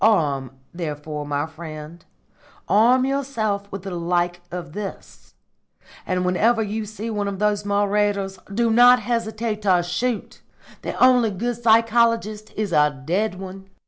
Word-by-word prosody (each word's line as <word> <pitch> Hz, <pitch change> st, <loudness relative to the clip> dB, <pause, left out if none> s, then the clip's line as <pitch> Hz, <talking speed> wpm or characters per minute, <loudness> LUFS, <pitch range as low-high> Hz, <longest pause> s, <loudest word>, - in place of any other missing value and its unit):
Arm, 145 Hz, -, +2 dB, 0.2 s
therefore, 150 Hz, -3 st, -5 dB
my 145 Hz, 0 st, -1 dB
friend 160 Hz, +1 st, -9 dB, 0.6 s
arm 245 Hz, +5 st, +4 dB
yourself 225 Hz, -8 st, -2 dB
with 195 Hz, -1 st, -6 dB
the 195 Hz, -, -6 dB
like 175 Hz, 0 st, -1 dB
of 175 Hz, -3 st, -7 dB
this; 205 Hz, 0 st, -8 dB, 0.7 s
and 180 Hz, 0 st, 0 dB
whenever 220 Hz, +6 st, +2 dB
you 215 Hz, +1 st, -3 dB
see 215 Hz, +2 st, -5 dB
one 205 Hz, -2 st, -2 dB
of 200 Hz, -1 st, -3 dB
those 205 Hz, 0 st, 0 dB
marauders, 200 Hz, -1 st, 0 dB
do 230 Hz, +2 st, +1 dB
not 245 Hz, +2 st, +7 dB
hesitate 220 Hz, -1 st, -2 dB
to 185 Hz, -4 st, +3 dB
shoot! 215 Hz, +7 st, -3 dB, 0.4 s
The -, -, -4 dB
only 250 Hz, -3 st, +5 dB
good 235 Hz, +4 st, -3 dB
psychologist 230 Hz, -1 st, +2 dB
is 210 Hz, -4 st, -2 dB
a 150 Hz, -3 st, +3 dB
dead 195 Hz, +5 st, 0 dB
one." 190 Hz, +1 st, -9 dB
205 Hz, 140 wpm, -22 LUFS, 175-225 Hz, 0.7 s, not